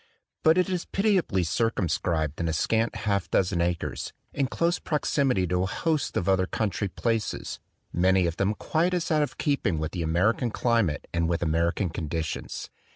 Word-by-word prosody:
But 160 +1 +5
it 180 - +3
is 180 -2 -2
pitiably 195 - +1
circum 110 +1 0
scribed 80 -2 -1
in 85 - 0
a 80 - 0
scant 115 +8 +1
half 100 -3 0
dozen 90 -2 +2
acres, 85 -1 -2 0.2
in 140 -2 +1
close 170 +6 0
proximity 140 - +1
to 90 +1 0
a - - +1
host 155 - -1
of 90 - -1
other 95 -1 +3
country 105 -1 -1
places, 115 +3 -2 0.3
many 95 +1 +3
of 85 -1 -2
them 100 +2 +1
quite 170 - 0
as 175 -2 -1
out 155 -1 +3
of 150 - -2
keeping 130 - 0
with 80 0 -2
the 90 - -3
American 90 +9 +2
climate 115 -9 +1
and 85 -1 +1
with 85 0 0
American 85 +3 +1
condi 80 0 -2
tions. - - -5
95 Hz, 180 wpm, -27 LUFS, 85-135 Hz, 0.3 s, But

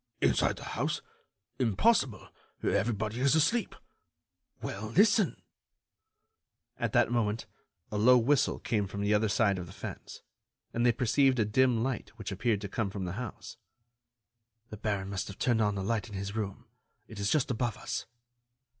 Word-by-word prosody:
"Inside 70 -2 +2
the - - -10
house? - - -1 0.6
Impossible! 130 - +2 0.3
Everybody 110 0 0
is 140 +3 +4
asleep." 180 +8 +2 0.8
"Well, 110 +3 -5
listen——" 205 - +3 1.4
At - - -1
that - - +4
moment 115 -2 0 0.5
a 105 - -1
low 125 +4 +7
whistle 130 +4 +2
came 105 -3 -1
from 100 +1 -5
the 100 +1 +2
other 105 +1 +2
side 100 -2 +2
of 90 - -6
the - - -11
fence, - - -8 0.5
and 120 - 0
they 120 - +6
perceived 130 +3 +3
a 110 - +3
dim 120 +1 +3
light 130 -2 -2
which 105 -3 -5
appeared 105 +1 0
to 100 - -4
come 100 +1 -2
from 95 -1 -4
the 90 - -3
house. 120 - -8 1.1
"The 105 - -6
baron 100 -2 -2
must 100 -2 -3
have 100 - -8
turned 120 -3 +2
on 105 -1 +2
the 95 - -3
light 110 +2 -1
in 105 - -8
his 100 +2 -4
room. 100 -3 -4 0.4
It 110 - -10
is 100 0 0
just 140 -1 +2
above 120 -2 -1
us." - - -4
110 Hz, 165 wpm, -30 LUFS, 100-125 Hz, 1.4 s, low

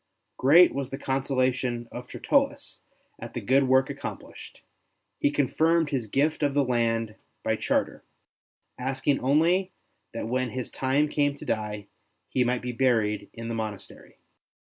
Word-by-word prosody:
Great 165 +7 +6
was 135 -2 -3
the 135 - -5
consolation 130 -3 -1
of 125 +1 -8
Tertullus - - 0 0.4
at - - -9
the - - -1
good 135 +1 +2
work 130 +1 +4
accomplished; 140 0 -8 0.6
he - - +3
confirmed 155 +3 +1
his 125 -6 -1
gift 150 +9 0
of 145 -2 +1
the 145 - +4
land 115 -3 0 0.3
by - - +1
charter, - - -1 0.8
asking 135 +2 0
only 170 +8 +2 0.4
that 115 - -3
when 130 +1 -1
his 125 +1 -4
time 135 +3 +1
came 145 -1 0
to - - -10
die, 105 -1 -3 0.4
he 130 - +2
might 125 0 -1
be 125 - -2
buried 110 -5 +1
in 115 0 -7
the 115 - -3
monastery. 110 -3 -7
130 Hz, 145 wpm, -26 LUFS, 120-140 Hz, 0.8 s, Great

